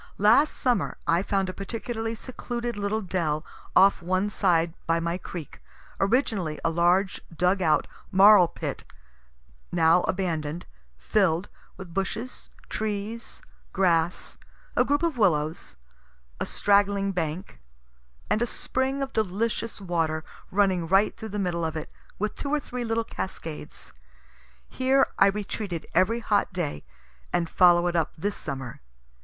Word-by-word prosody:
Last 230 +9 +5
summer 245 -4 0
I 170 +2 +3
found 195 -1 0
a 185 - -4
particularly 225 +3 -4
secluded 240 0 -5
little 205 +2 -1
dell 165 -5 -1 0.3
off 195 -1 +6
one 185 +4 0
side 170 -5 +2
by 165 0 +2
my 170 +2 -2
creek, 170 -5 -8 0.4
originally 195 - +1
a 165 - +3
large 175 +3 +2
dug 180 +4 +1
out 160 -3 +3 0.3
marl 195 -1 +8
pit, - - -5 0.9
now 165 +1 +4
abandon'd, 170 -3 -2 0.3
fill'd, 180 - +1 0.3
with 185 -3 -10
bushes, 215 +7 -4 0.2
trees, 215 +2 -4 0.3
grass, 175 -2 +1 0.4
a - - +5
group 290 +3 +1
of 325 -7 0
willows, 155 - +1 0.6
a - - -2
straggling 200 -1 +2
bank, 175 +1 -4 0.7
and 215 - +1
a 240 - +2
spring 265 +3 -1
of 270 - -6
delicious 220 +2 -1
water 165 -4 -1 0.3
running 190 -4 +2
right 195 +4 +3
through 220 - -7
the 210 - -4
middle 175 -4 -1
of 160 -1 -2
it, 155 - -5 0.3
with 210 +1 -1
two 280 - -5
or 300 +1 +2
three 250 -3 -5
little 225 0 0
cascades. 165 -7 -6 0.7
Here 265 +1 +3
I 195 - +7
retreated 200 -3 -3
every 225 +6 +2
hot 205 -2 +1
day, 170 - -3 0.5
and 175 -1 +1
follow 175 0 +5
it 175 0 0
up 165 -2 0
this 200 +5 -2
summer. 135 -4 -6
195 Hz, 140 wpm, -26 LUFS, 170-220 Hz, 0.9 s, marl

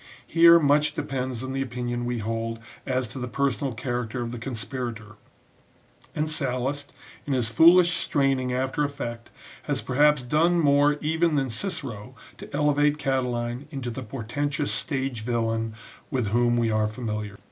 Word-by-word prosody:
Here, 170 0 +7
much 150 -1 +3
depends 130 -2 -3
on 130 0 -4
the 135 - -1
opinion 120 -1 -3
we 120 0 -2
hold 115 +1 -3 0.3
as 130 -2 0
to 130 - -7
the 125 - -3
personal 140 +2 -1
character 120 0 -3
of 115 - -5
the 120 - -6
conspirator; 115 -3 -5 1.0
and 150 0 0
Sallust, 140 -1 -1 0.4
in 140 - 0
his 120 -3 +1
foolish 170 +6 +6
straining 135 -3 +1
after 130 +3 0
effect, 120 -5 -5 0.4
has - - -1
perhaps 145 +1 +3
done 165 +7 +2
more 145 -1 +4
even 160 +1 +1
than 135 -3 0
Cicero 125 - -4 0.2
to - - -10
elevate 145 0 +2
Catiline 125 -2 -2
into 130 -4 -5
the 130 - -6
portentous 140 +5 -3
stage 135 -5 -2
villain 115 -1 -1 0.3
with 125 -8 -1
whom 120 +2 +2
we 115 -1 +1
are 110 0 +2
familiar. 105 -2 -5
130 Hz, 150 wpm, -25 LUFS, 120-145 Hz, 1.0 s, Here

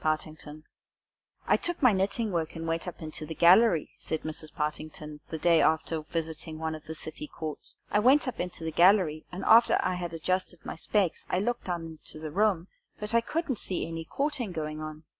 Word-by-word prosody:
PARTINGTON 155 0 -2
IN 155 - -14
COURT - - -37 0.8
"I - - +4
took 350 0 -1
my 250 -5 +5
knitting 200 +3 0
work 165 -3 -2
and 165 0 -5
went 165 +2 -1
up 175 - -7
into 155 0 -6
the 160 +1 -6
gallery," 175 -1 +5
said 160 - -3
Mrs. 155 0 -5
Partington, 150 0 -5
the 160 - -3
day 165 0 +4
after 160 0 +1
visiting 160 0 -4
one 160 0 -2
of 155 -1 -9
the 160 - -5
city 155 -1 -5
courts; 155 -2 -7 0.2
"I 210 - +4
went 260 +6 +5
up 250 - -4
into 175 -2 -4
the 160 - -2
gallery, 170 -2 +4
and 185 +2 -5
after 230 +2 +7
I - - +1
had 175 -1 -4
adjusted 185 +1 -2
my - - -5
specs, 190 +1 0
I - - +1
looked 235 +6 -1
down 175 -2 -3
into 160 -1 -8
the 155 -1 -6
room, 190 -1 +2 0.3
but 210 +1 -4
I 230 - +5
couldn't 305 -2 -2
see 180 - -1
any 165 0 -5
courting 275 - -2
going 155 -2 -4
on. 155 0 -7
165 Hz, 210 wpm, -29 LUFS, 155-195 Hz, 0.8 s, after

